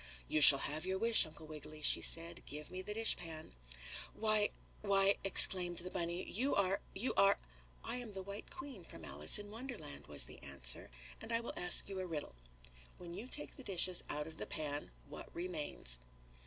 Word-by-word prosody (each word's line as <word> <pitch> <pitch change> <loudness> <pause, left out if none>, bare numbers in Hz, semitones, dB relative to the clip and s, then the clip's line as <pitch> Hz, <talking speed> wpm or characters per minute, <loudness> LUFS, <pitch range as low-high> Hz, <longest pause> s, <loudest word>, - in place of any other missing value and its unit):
"You 155 - 0
shall 140 -1 +12
have 155 +2 -2
your 190 +1 -2
wish, 230 -4 +3
Uncle 155 +1 -12
Wiggily," 155 0 -10
she - - +4
said. 165 +1 +2
"Give 150 +3 -7
me 185 0 -6
the 210 +2 -7
dishpan." 165 -8 +1 0.6
"Why 215 -1 +2 0.3
why!" 200 -1 +3
exclaimed 180 -2 +4
the 180 +1 -5
bunny. 170 +1 -3
"You 255 +8 -1
are 195 0 +1
you 220 +7 -2
are 200 0 +4 0.3
" - - -28
"I - - -2
am 240 -4 -8
the 190 -1 -6
White 200 +2 -9
Queen 265 -8 -10
from 85 - -12
Alice 75 +2 +2
in 205 0 -9
Wonderland," 225 - -8
was - - -1
the - - -13
answer, 65 -3 -1 0.3
"and 225 - -7
I 230 - +3
will 235 - -6
ask 180 0 +5
you 195 -1 -5
a 185 - -4
riddle. 155 - -6 0.6
When 175 -1 -10
you 210 +7 -8
take 295 +3 -6
the 270 - -11
dishes 185 -3 +1
out 150 0 -2
of 160 0 -11
the - - -5
pan 145 -1 -4 0.2
what - - -10
remains?" 150 - -4
180 Hz, 195 wpm, -35 LUFS, 155-205 Hz, 0.6 s, shall